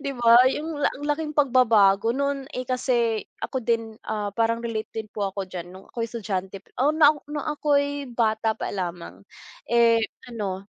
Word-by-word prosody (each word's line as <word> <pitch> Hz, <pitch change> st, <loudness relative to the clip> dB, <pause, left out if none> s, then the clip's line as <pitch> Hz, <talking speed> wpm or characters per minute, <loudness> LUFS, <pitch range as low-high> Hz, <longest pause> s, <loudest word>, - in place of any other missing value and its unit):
'Di 280 Hz, -, -2 dB
ba, 235 Hz, -1 st, +6 dB, 0.2 s
'yung 315 Hz, +1 st, -4 dB
ang 285 Hz, -, -1 dB
laking 300 Hz, +1 st, -1 dB
pagbabago, 230 Hz, -7 st, +4 dB
no'n, 280 Hz, 0 st, -2 dB
eh, 255 Hz, -1 st, -5 dB
kasi 240 Hz, -4 st, +1 dB, 0.2 s
ako 260 Hz, -2 st, -3 dB
din 230 Hz, -1 st, -1 dB
,ah, 205 Hz, -2 st, -3 dB
parang 230 Hz, 0 st, +2 dB
relate 230 Hz, -2 st, -4 dB
din 220 Hz, -1 st, -5 dB
po 200 Hz, -2 st, -3 dB
ako 195 Hz, -1 st, -5 dB
diyan 175 Hz, -1 st, -7 dB
nung 190 Hz, +1 st, -13 dB
ako'y 230 Hz, -1 st, -4 dB
estudyante, 195 Hz, -4 st, -4 dB, 0.2 s
oh, 290 Hz, -, +4 dB
na 310 Hz, -1 st, +6 dB, 0.2 s
nung 295 Hz, 0 st, -4 dB
ako'y 285 Hz, -2 st, 0 dB
bata 220 Hz, -2 st, +1 dB
pa -, -, -3 dB
lamang. 175 Hz, -3 st, -5 dB, 0.5 s
Eh, 230 Hz, -1 st, +4 dB, 0.3 s
ano, 200 Hz, -4 st, -5 dB
230 Hz, 165 wpm, -24 LUFS, 205-275 Hz, 0.5 s, ba